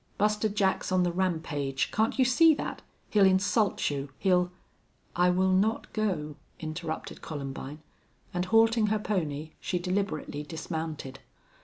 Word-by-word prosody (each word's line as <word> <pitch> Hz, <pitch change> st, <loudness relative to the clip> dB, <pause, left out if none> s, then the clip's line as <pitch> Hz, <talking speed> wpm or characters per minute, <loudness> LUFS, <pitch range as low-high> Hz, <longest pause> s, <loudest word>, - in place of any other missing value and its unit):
"Buster 210 Hz, +1 st, +2 dB
Jack's 200 Hz, -2 st, 0 dB
on 185 Hz, -1 st, +3 dB
the 175 Hz, -, +1 dB
rampage. 160 Hz, -7 st, -1 dB
Can't 220 Hz, +5 st, +1 dB
you 260 Hz, -, +4 dB
see 310 Hz, +6 st, +6 dB
that? -, -, -5 dB, 0.3 s
He'll 210 Hz, -2 st, +5 dB
insult 195 Hz, 0 st, +3 dB
you. 140 Hz, 0 st, -4 dB
He'll 180 Hz, -2 st, +2 dB, 0.3 s
" -, -, -38 dB
"I 180 Hz, +1 st, +4 dB
will 185 Hz, +1 st, +2 dB
not 205 Hz, +4 st, +1 dB
go," 170 Hz, -9 st, -1 dB, 0.2 s
interrupted 160 Hz, 0 st, -5 dB
Columbine, 145 Hz, 0 st, -6 dB, 0.5 s
and, 180 Hz, 0 st, -1 dB
halting 225 Hz, +1 st, +4 dB
her 215 Hz, +1 st, +2 dB
pony, 160 Hz, -8 st, -2 dB
she 180 Hz, -, -2 dB
deliberately 180 Hz, -5 st, -2 dB
dismounted. 160 Hz, -3 st, -5 dB
180 Hz, 140 wpm, -29 LUFS, 155-210 Hz, 0.5 s, see